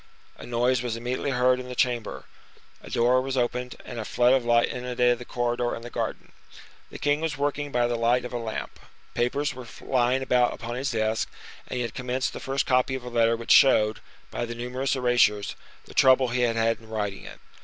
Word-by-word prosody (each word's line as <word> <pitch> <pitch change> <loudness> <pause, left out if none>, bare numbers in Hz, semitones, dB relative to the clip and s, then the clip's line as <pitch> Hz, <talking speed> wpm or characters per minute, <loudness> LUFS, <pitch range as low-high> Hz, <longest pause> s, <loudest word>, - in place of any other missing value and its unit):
A - - -11
noise 120 +1 +1
was 120 -2 -3
immediately 125 +4 -3
heard 125 -1 +2
in 125 0 -7
the 125 - -6
chamber, 120 -2 -1 0.6
a - - -11
door 125 +2 +3
was 135 0 -3
opened, 125 0 -1
and 120 - -6
a - - -3
flood 120 +3 +3
of 135 -2 +2
light 120 0 +3
inundated 125 -1 0
the 120 - -8
corridor 120 0 -1
and 115 - -9
the 120 - -8
garden. - - -4 0.6
The - - -9
king 145 +1 +1
was 160 -3 -2
working 145 0 -2
by 120 -1 +2
the 120 0 0
light 120 +2 +2
of 125 - -7
a 120 - -2
lamp. 110 -2 -5 0.3
Papers 140 +5 0
were 125 -2 -10
lying 130 +1 +1
about 125 -1 +2
upon 115 +1 -6
his 130 +3 -2
desk, 110 -1 -1 0.4
and - - -5
he 125 - 0
had 115 -2 -5
commenced 130 +1 -2
the - - -6
first 135 0 -1
copy 130 +1 +2
of 130 - -6
a 125 - -6
letter 115 -1 +2
which 115 - -3
showed, 110 -5 +5 0.3
by - - -3
the 120 0 -5
numerous 125 +3 -2
erasures, 120 -5 +2 0.3
the - - -14
trouble 130 -1 +5
he 125 +1 0
had 120 -2 +2
had 115 0 +1
in 110 -1 -17
writing 105 -3 -3
it. - - -11
125 Hz, 220 wpm, -26 LUFS, 120-130 Hz, 0.6 s, showed